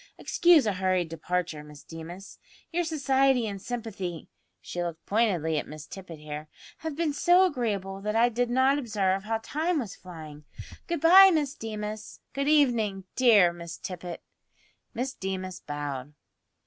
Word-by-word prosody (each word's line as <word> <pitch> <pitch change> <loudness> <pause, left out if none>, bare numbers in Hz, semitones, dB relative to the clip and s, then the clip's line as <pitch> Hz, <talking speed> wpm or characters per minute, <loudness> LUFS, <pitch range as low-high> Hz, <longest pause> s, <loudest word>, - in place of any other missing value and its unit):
"Excuse 340 -6 +4
a 210 - +1
hurried 185 -2 0
departure, 165 -1 -3
Miss 150 -1 -13
Deemas. 170 +4 -10 0.3
Your 350 +1 0
society 270 -5 +2
and 200 -2 -5
sympathy" 205 -8 -5 0.3
(she 175 - -5
looked 170 -2 -5
pointedly 180 -8 +1
at - - -6
Miss 155 0 -9
Tippet 180 -3 -9
here) 150 0 -7 0.3
"have 320 -2 -4
been 320 -2 0
so 355 +5 +5
agreeable 205 - -2
that 210 +1 -2
I 230 +2 +5
did 245 +1 -1
not 260 +3 +3
observe 200 -5 0
how 225 +1 0
time 325 +6 -1
was 230 -9 -4
flying. 155 -4 -11 0.4
Good 340 -3 -2
bye, 380 +4 +9
Miss 295 -5 0
Deemas. 215 -2 -6
Good 275 +1 -1
evening, 235 -10 +3
dear 210 -9 +5
Miss 170 -1 -8
Tippet." 180 -1 -7 0.7
Miss 260 +3 -2
Deemas 185 -3 -5
bowed. 145 -1 -5
205 Hz, 150 wpm, -27 LUFS, 175-265 Hz, 0.7 s, bye